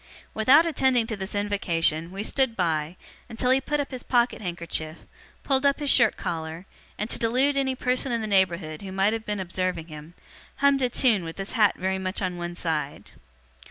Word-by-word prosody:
Without 265 +9 +5
attending 265 -7 +2
to 220 -1 -4
this 195 0 -6
invocation, 170 -5 0
we 195 +2 -5
stood 265 0 +1
by, 160 -3 -1 0.3
until 250 +3 0
he 265 +1 +3
put 295 +2 -2
up 285 - -3
his 255 -2 -6
pocket 240 -2 +1
handkerchief, 170 -3 -4 0.5
pulled 270 -1 +1
up 280 -1 +3
his 290 -2 +1
shirt 230 -4 +4
collar, 160 +2 -5 0.3
and, 210 - -3
to - - +2
delude 255 +5 +2
any 265 -1 0
person 250 +1 0
in 235 - 0
the 220 - -3
neighbourhood 180 -6 0
who 195 -1 -7
might 195 +3 +2
have 225 -1 -5
been 210 -1 -2
observing 185 -2 -3
him, 155 +2 -11 0.4
hummed 280 -1 +3
a 250 - +2
tune 235 -6 +2
with 165 0 -7
his 195 0 -4
hat 215 -5 +3
very 190 +1 -1
much 185 +1 -2
on 185 -2 -2
one 175 0 -5
side. 155 -5 -3
205 Hz, 195 wpm, -25 LUFS, 175-250 Hz, 0.5 s, Without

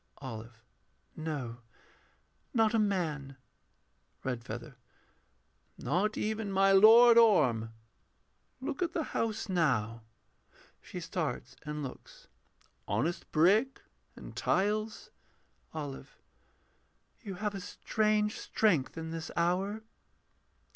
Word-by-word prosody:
OLIVE. 115 -3 -9 0.5
No; 145 -7 -4 1.0
not 225 -1 +3
a 225 - +3
man. 155 -10 -1 0.9
REDFEATHER. 120 +1 -5 1.0
Not 210 +5 0
even 215 -1 -2
my 195 0 +4
Lord 230 +4 +8
Orm. 125 - +4 0.9
Look 270 +3 -4
at 340 -2 0
the 325 - 0
house 220 -1 -1
now 125 - 0 0.8
[She 180 - -8
starts 140 -8 -4
and 150 0 -4
looks.] 130 - -10 0.6
Honest 135 - -2
brick 205 +12 +3 0.3
and - - -11
tiles. 215 +2 -1 0.6
OLIVE. 145 -4 -7 1.0
You 200 -6 -6
have 210 +2 -2
a 195 - -5
strange 210 +1 0
strength 170 -13 +1
in 160 0 -5
this 165 -1 -5
hour. 190 +5 0
180 Hz, 95 wpm, -31 LUFS, 135-215 Hz, 1.0 s, Lord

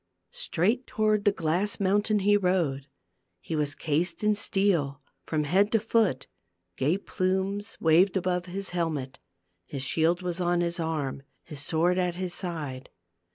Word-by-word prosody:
Straight 220 +10 0
toward 215 -3 +1
the 205 - +6
glass 180 +3 0
mountain 205 +2 +2
he 205 0 +5
rode. 175 -8 0 0.5
He 165 - -5
was 145 -1 -1
cased 160 +7 -1
in 210 0 +4
steel 195 -9 +1 0.3
from 155 -2 0
head 195 +7 +2
to 225 - +5
foot; 215 - +1 0.5
gay 150 +8 +1
plumes 195 +2 -2
waved 175 +5 +4
above 180 -1 -1
his 195 +2 -4
helmet, 155 -7 -2 0.4
his 135 +8 -5
shield 165 +5 +1
was 180 0 -2
on 175 0 +2
his 170 +1 -1
arm, 155 -5 -2 0.2
his 150 - -6
sword 170 +5 +2
at 180 -1 0
his 180 -1 -3
side. 150 -9 -4
175 Hz, 150 wpm, -27 LUFS, 155-195 Hz, 0.5 s, the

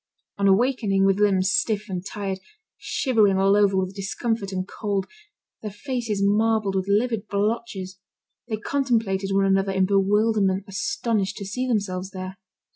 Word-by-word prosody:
On 200 - +3
awakening, 200 -2 +3
with 195 0 +2
limbs 195 -2 +3
stiff 210 +1 0
and 180 -3 -4
tired, 195 -1 -4 0.4
shivering 215 -7 +2
all 195 +1 +4
over 200 -2 +3
with 190 0 -1
discomfort 200 +1 -3
and 185 0 -3
cold, 200 -3 -2 0.6
their 215 - -4
faces 225 -2 -3
marbled 215 0 +2
with 190 0 -1
livid 220 +1 +1
blotches, 200 -2 -2 0.5
they 220 -3 -2
contemplated 220 -7 0
one 195 0 +3
another 195 0 +2
in 190 0 +3
bewilderment, 200 0 +2
astonished 215 -1 -1
to 200 - -6
see 250 +6 -3
themselves 195 -5 -1
there. 185 0 -7
200 Hz, 145 wpm, -24 LUFS, 195-220 Hz, 0.6 s, all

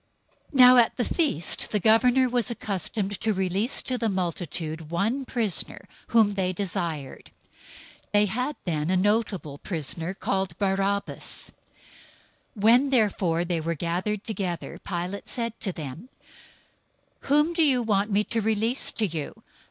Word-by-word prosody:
027:015 - - -2
Now 250 0 +9
at 235 -2 +3
the 245 - +1
feast 285 - +2
the 210 - +1
governor 245 +5 +4
was 245 -3 0
accustomed 205 -2 -3
to 220 -2 0
release 190 +6 +1
to 255 -1 -2
the 225 - +1
multitude 165 -4 -3
one 220 +11 -1
prisoner, 225 -8 -1 0.2
whom 220 -3 +3
they 190 -2 0
desired. 170 -7 -4 0.8
027:016 - - -41
They 205 0 +5
had 250 +8 -2
then 155 -3 -1
a 185 - +2
notable 195 -7 -1
prisoner, 165 +1 -3
called 190 -3 -2
Barabbas. 195 0 -1 1.1
027:017 - - -7
When 245 +5 +5
therefore 195 -9 +1
they 170 -2 -1
were 165 +1 -2
gathered 180 +6 -2
together, 185 -6 -4
Pilate 180 +2 -5
said 230 -2 -3
to 195 - -1
them, 160 - -8 1.1
"Whom 295 +4 +2
do 335 - +1
you 265 -6 +4
want 205 -1 +1
me 205 0 +2
to 225 +1 -2
release 220 +4 +1
to 220 - +1
you? 160 -6 -5
200 Hz, 145 wpm, -25 LUFS, 175-230 Hz, 1.1 s, Now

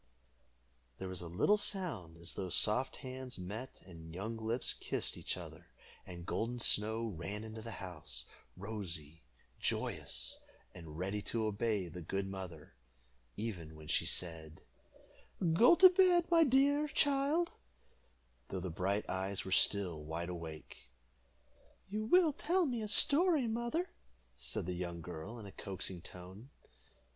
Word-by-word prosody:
There 95 - -5
was 95 -1 -4
a 85 - -6
little 105 - +3
sound, 160 - -1
as 85 0 -3
though 95 -2 -4
soft 110 +8 +4
hands 130 0 -5
met 105 +8 -7
and 80 -2 -11
young 110 +5 -3
lips 115 +2 +2
kissed - - -1
each - - -2
other, - - -10 0.4
and 85 -2 -8
Golden 115 +5 -1
Snow 110 0 +2
ran 100 +1 -5
into 110 0 -7
the 115 - -7
house, 75 -9 -6 0.3
rosy, 90 -7 -6 0.4
joyous, - - -2 0.3
and 80 -2 -9
ready 95 +4 -2
to 110 +1 0
obey 105 -2 0
the 85 +2 -8
good 95 +4 -2
mother, 95 -5 -7 0.6
even 90 -8 -5
when 80 0 -11
she - - +2
said, 80 -3 -3 0.9
"Go 240 - +7
to 370 +2 +10
bed, 360 -2 +5
my 330 -1 +7
dear 285 +3 +4
child," 285 +4 +2 1.0
though 95 - -3
the 90 -1 -4
bright 95 +5 -1
eyes 95 +1 -2
were 95 - -5
still 90 -6 +2
wide 80 +3 -4
awake. 80 -7 -8 1.0
"You 215 +2 -2
will 330 +4 +5
tell 355 +5 +2
me 245 -5 -1
a 215 - -3
story, 300 - +5
mother," 240 +11 -1 0.4
said - - -3
the 90 - -2
young 85 -1 -4
girl, 90 +7 -7
in 110 - -8
a 100 - -9
coaxing 95 -2 -4
tone. 95 +9 -8
100 Hz, 145 wpm, -35 LUFS, -, 1.0 s, to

